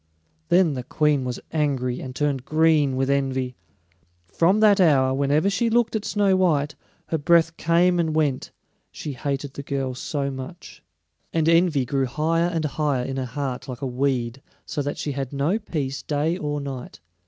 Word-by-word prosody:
Then 175 -4 +4
the 130 - -3
Queen 145 +1 +1
was 125 -1 -3
angry, 135 -5 0
and 130 -1 -7
turned 140 -3 -1
green 155 -2 +3
with 130 0 0
envy. 130 -2 0 0.7
From 170 - +2
that 210 -2 +5
hour, 135 -6 +4
whenever 140 +5 +2
she 230 +4 +1
looked 230 0 +2
at 215 -1 -2
Snow 200 -2 +2
white, 150 -6 +2 0.4
her 160 - 0
breath 165 +1 +3
came 175 +2 +3
and 160 -2 0
went, 145 -5 0 0.4
she 150 - -6
hated 140 +1 -3
the - - -6
girl 135 -2 -3
so 140 +2 -3
much. 135 +7 -9 0.5
And 160 -1 +1
envy 165 -5 +3
grew 135 +1 0
higher 160 +6 +1
and 165 -3 -1
higher 145 -3 0
in 135 0 -4
her 130 - -2
heart 130 +1 -4
like 125 -3 -7
a - - 0
weed, 130 -1 -1 0.2
so 150 -1 -3
that 145 +1 -3
she 145 - -3
had 135 -2 -4
no 145 +9 0
peace 140 -9 -3
day 155 +3 0
or 145 -4 -3
night. 135 - -7
145 Hz, 175 wpm, -24 LUFS, 135-165 Hz, 0.7 s, that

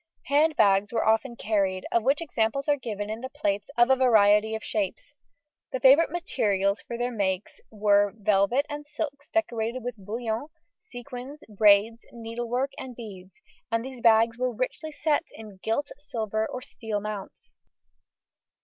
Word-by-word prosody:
Hand 300 +2 +3
bags 200 -3 +3
were 230 - 0
often 225 +3 +2
carried, 195 -5 -1
of 235 - +3
which 275 +7 +2
examples 275 -2 -1
are 290 - +4
given 215 -6 -5
in 220 +2 -5
the 260 - -5
plates 205 -1 -2
of 240 +2 +5
a - - +7
variety 220 -4 +4
of 220 - -6
shapes; 210 +6 -3 0.6
the 260 - -2
favourite 275 +6 +6
materials 205 - 0
for 235 - -6
their 245 +1 -1
make 195 -4 -1 0.2
were 205 -1 +2
velvets 210 +6 +2
and 295 0 -7
silks 295 -1 -5
decorated 240 -6 -1
with 245 -1 -4
bullion, 225 +5 -3 0.3
sequins, 255 - -9
braids, 210 +2 +4
needlework, 240 +3 -3
and 255 -2 -7
beads, 200 -1 -11 0.3
and 230 +1 0
these 260 -2 -8
bags 230 0 +4
were 255 0 0
richly 255 +6 -4
set 300 0 0
in 215 -3 -11
gilt, 280 +6 -1
silver, 220 -6 -2
or 255 - -6
steel 220 -6 -4
mounts. 205 -1 -7
230 Hz, 155 wpm, -26 LUFS, 210-260 Hz, 0.6 s, a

